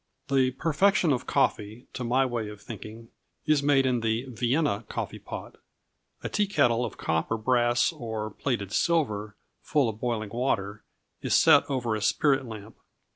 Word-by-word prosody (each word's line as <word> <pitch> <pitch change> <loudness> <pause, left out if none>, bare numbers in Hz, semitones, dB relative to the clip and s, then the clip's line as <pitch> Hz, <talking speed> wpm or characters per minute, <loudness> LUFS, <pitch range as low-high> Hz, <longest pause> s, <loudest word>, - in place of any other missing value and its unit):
The 135 -2 +3
perfection 165 +5 +2
of 125 - -3
coffee, 110 +4 0
to 130 - -4
my 125 +3 +2
way 120 -4 -3
of 105 -1 -10
thinking, 115 +2 -10 0.4
is 155 -2 +3
made 140 -2 +3
in 125 -2 +1
the 115 +2 -1
"Vienna 120 -1 0
coffee - - -4
pot." - - -8 0.7
A - - -1
tea 210 -1 0
kettle 120 - +2
of 115 - -5
copper, 80 +8 -1
brass, 120 +1 +2
or 110 -2 -5
plated 115 -8 -3
silver, 110 -13 0 0.3
full 145 -5 +1
of 110 -1 -5
boiling 115 -3 -2
water, 105 -5 -2 0.4
is - - +1
set - - +6
over 125 -5 -1
a 110 - -4
spirit 135 +5 +2
lamp. 110 -1 -10
120 Hz, 160 wpm, -27 LUFS, 110-135 Hz, 0.7 s, set